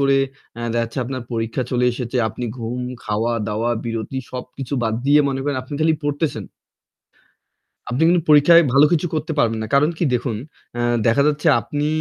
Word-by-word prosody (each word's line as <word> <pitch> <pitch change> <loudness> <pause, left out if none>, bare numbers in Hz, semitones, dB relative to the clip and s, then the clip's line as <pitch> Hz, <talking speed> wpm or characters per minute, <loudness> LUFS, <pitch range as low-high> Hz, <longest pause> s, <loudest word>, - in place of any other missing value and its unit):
করে 140 0 +3 0.4
এ - - -7
দেখা 120 - +1
যাচ্ছে 115 +3 -7
আপনার 130 0 -5
পরীক্ষা 115 +2 -2
চলে 125 -1 +1
এসেছে, 120 +1 -4
আপনি 115 +3 -6
ঘুম, 120 +1 -4 0.2
খাওয়া-দাওয়া, 110 +1 -1
বিরতি 115 +2 -4 0.2
সবকিছু 125 +1 -7
বাদ 110 -1 0
দিয়ে 145 +1 +6
মনে 135 -1 -2
করেন 145 0 -1
আপনি 130 - -12
খালি 160 +1 +3
পড়তেছেন। 145 +1 -1 1.5
আপনি 125 +5 -1
কিন্তু 175 0 +3
পরীক্ষায় 150 +3 +7
ভালো 140 +3 +6
কিছু 170 +1 +2
করতে 155 +1 -2
পারবেন 115 -4 +2
না। - - -3
কারণ 145 +3 +4
কি - - +1
দেখুন, 120 -2 -1 0.4
এ - - -1 0.3
দেখা 115 +5 +4
যাচ্ছে 150 +1 0
আপনি 145 +4 -3
130 Hz, 175 wpm, -20 LUFS, 115-145 Hz, 1.5 s, পরীক্ষায়